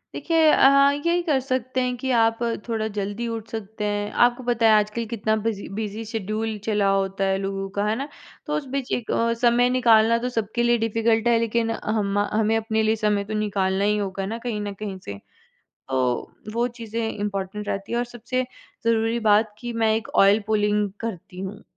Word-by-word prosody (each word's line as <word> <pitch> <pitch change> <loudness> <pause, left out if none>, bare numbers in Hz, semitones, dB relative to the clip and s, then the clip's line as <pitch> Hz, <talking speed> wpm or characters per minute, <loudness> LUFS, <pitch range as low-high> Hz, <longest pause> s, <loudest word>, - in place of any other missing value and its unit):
देखिए 325 -2 +3
अ, 275 0 +6
यही 345 +1 +2
कर 300 -6 +2
सकते 255 -1 -2
हैं 250 0 -1
कि 265 +2 -4
आप 225 0 +2 0.3
थोड़ा 220 -2 -1
जल्दी 205 +3 -3
उठ 225 -1 -5
सकते 220 -1 -5
हैं, 205 0 -2
आपको 245 +1 +2
पता 240 -1 +1
है 220 - +7
आजकल 210 +3 -2
कितना 220 -1 0
बिज़ी 215 -3 -2
बिज़ी 215 +1 -4
शेड्यूल 220 0 -3
चला 205 -2 +2
होता 195 0 0
है 190 0 +1
लोगों 195 0 -3
का, 205 - +1
है 215 - +1
ना? 275 +4 -4 0.4
तो 300 - -2
उस 300 - -4
बीच 275 -2 -3
एक 240 - -2 0.3
समय 245 0 +4
निकालना 230 -2 +4
तो - - 0
सबके 230 0 -1
लिए 240 0 +3
डिफिकल्ट 225 +1 +1
है 235 - +4
लेकिन 230 0 0
हम 210 -3 -1
अ, 205 - 0
हमें 220 +1 +2
अपने 220 0 0
लिए 220 +1 +2
समय 210 -2 +1
तो 215 - -6
निकालना 200 -2 0
ही 210 0 +2
होगा 195 -1 -3
ना 220 +4 -4
कहीं 220 -3 -2
न 205 -1 -4
कहीं 200 -1 -6
से। 100 0 -6 0.7
तो 130 -2 -1 0.2
वो 235 +2 +1
चीज़ें 230 0 -4
इम्पोर्टेंट 205 0 -4
रहती 200 +2 -4
है 235 - +1
और 240 - 0
सबसे 245 +2 -3 0.4
ज़रूरी 225 0 +2
बात 215 0 +3
कि 240 +1 -5
मैं 225 -1 +2
एक 225 - -5
ऑयल 200 +2 +5
पुलिंग 210 -1 +1
करती 185 -5 -6
हूँ, 195 +2 -6
220 Hz, 200 wpm, -24 LUFS, 205-235 Hz, 0.7 s, है